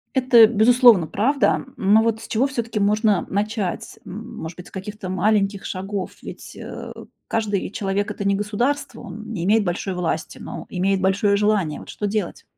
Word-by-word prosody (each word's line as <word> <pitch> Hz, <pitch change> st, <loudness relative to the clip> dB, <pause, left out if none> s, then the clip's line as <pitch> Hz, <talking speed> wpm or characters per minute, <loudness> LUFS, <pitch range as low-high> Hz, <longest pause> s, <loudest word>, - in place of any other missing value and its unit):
Это, 245 Hz, -4 st, +7 dB
безусловно, 235 Hz, -3 st, +5 dB
правда, 225 Hz, -, +1 dB
но 205 Hz, +3 st, +4 dB
вот 225 Hz, -1 st, 0 dB
с -, -, -9 dB
чего 245 Hz, +5 st, +1 dB
всё-таки 235 Hz, -5 st, -3 dB
можно 210 Hz, -1 st, +2 dB
начать? 205 Hz, -2 st, -3 dB
М, 220 Hz, +6 st, -8 dB
может 160 Hz, +1 st, -7 dB
быть, 180 Hz, -, -10 dB
с -, -, -16 dB
каких-то 200 Hz, 0 st, -7 dB
маленьких 195 Hz, +1 st, +1 dB
шагов? 195 Hz, 0 st, -4 dB
Ведь, -, -, -9 dB
э, -, -, -8 dB, 0.4 s
каждый 210 Hz, -3 st, -1 dB
человек 200 Hz, 0 st, -2 dB
это -, -, -5 dB
не 200 Hz, -, +3 dB
государство, 230 Hz, +8 st, -2 dB
он 220 Hz, +1 st, -9 dB
не 180 Hz, -6 st, -3 dB
имеет 215 Hz, +1 st, +4 dB
большой 180 Hz, +1 st, -2 dB
власти, 170 Hz, -3 st, -3 dB
но -, -, -7 dB
имеет 190 Hz, +1 st, 0 dB
большое 200 Hz, +2 st, +2 dB
желание. 205 Hz, -7 st, +1 dB
Вот -, -, -12 dB
что 210 Hz, -, -3 dB
делать? 205 Hz, -3 st, -3 dB
205 Hz, 170 wpm, -22 LUFS, 190-220 Hz, 0.4 s, Это